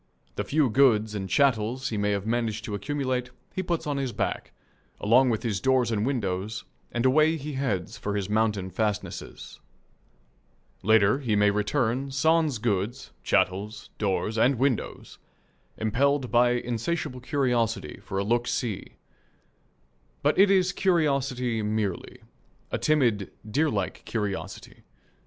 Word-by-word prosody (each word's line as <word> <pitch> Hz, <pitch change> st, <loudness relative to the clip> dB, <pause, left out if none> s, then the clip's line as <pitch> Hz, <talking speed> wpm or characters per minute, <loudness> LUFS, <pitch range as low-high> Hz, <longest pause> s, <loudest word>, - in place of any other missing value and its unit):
The -, -, -2 dB
few 150 Hz, -1 st, +2 dB
goods 110 Hz, -4 st, +4 dB
and 95 Hz, -2 st, -4 dB
chattels 130 Hz, +2 st, +1 dB
he 110 Hz, -, -3 dB
may 105 Hz, 0 st, +1 dB
have 100 Hz, -1 st, -1 dB
managed 115 Hz, -2 st, -1 dB
to 105 Hz, -, -5 dB
accumulate 130 Hz, +2 st, -2 dB, 0.2 s
he 190 Hz, -, -2 dB
puts 175 Hz, -2 st, -2 dB
on 145 Hz, -2 st, -1 dB
his 135 Hz, -2 st, -2 dB
back, -, -, -3 dB, 0.5 s
along 125 Hz, +5 st, +4 dB
with 110 Hz, -2 st, -1 dB
his 105 Hz, -5 st, -1 dB
doors 130 Hz, -2 st, +2 dB
and 105 Hz, -2 st, 0 dB
windows, 105 Hz, -4 st, -2 dB, 0.3 s
and 120 Hz, +1 st, -1 dB
away 155 Hz, +5 st, +4 dB
he 150 Hz, 0 st, -6 dB
heads 110 Hz, -10 st, -2 dB
for 105 Hz, 0 st, -3 dB
his 100 Hz, -2 st, -1 dB
mountain 105 Hz, -3 st, 0 dB
fastnesses. 105 Hz, +1 st, -4 dB, 1.2 s
Later 110 Hz, +3 st, +4 dB
he 120 Hz, -7 st, 0 dB
may 105 Hz, 0 st, +4 dB
return, 120 Hz, +5 st, 0 dB
sans 155 Hz, 0 st, +2 dB
goods, 110 Hz, +3 st, -2 dB
chattels, 100 Hz, +4 st, 0 dB
doors, 105 Hz, +2 st, 0 dB
and 130 Hz, +4 st, +4 dB
windows, 130 Hz, -1 st, -2 dB, 0.6 s
impelled 130 Hz, +4 st, +1 dB
by 120 Hz, 0 st, +4 dB
insatiable 125 Hz, +3 st, -2 dB
curiosity 125 Hz, -4 st, -1 dB
for 95 Hz, -, -5 dB
a 100 Hz, -, +1 dB
"look 120 Hz, +3 st, +1 dB
see." 110 Hz, -6 st, -3 dB, 1.3 s
But -, -, +3 dB
it 200 Hz, +1 st, +7 dB
is 190 Hz, -1 st, +3 dB
curiosity 135 Hz, -, +1 dB
merely 105 Hz, -3 st, -3 dB, 0.5 s
a -, -, -1 dB
timid, 120 Hz, -10 st, +2 dB, 0.2 s
deerlike 110 Hz, -5 st, -1 dB
curiosity. 105 Hz, -4 st, -4 dB
120 Hz, 135 wpm, -26 LUFS, 105-135 Hz, 1.3 s, it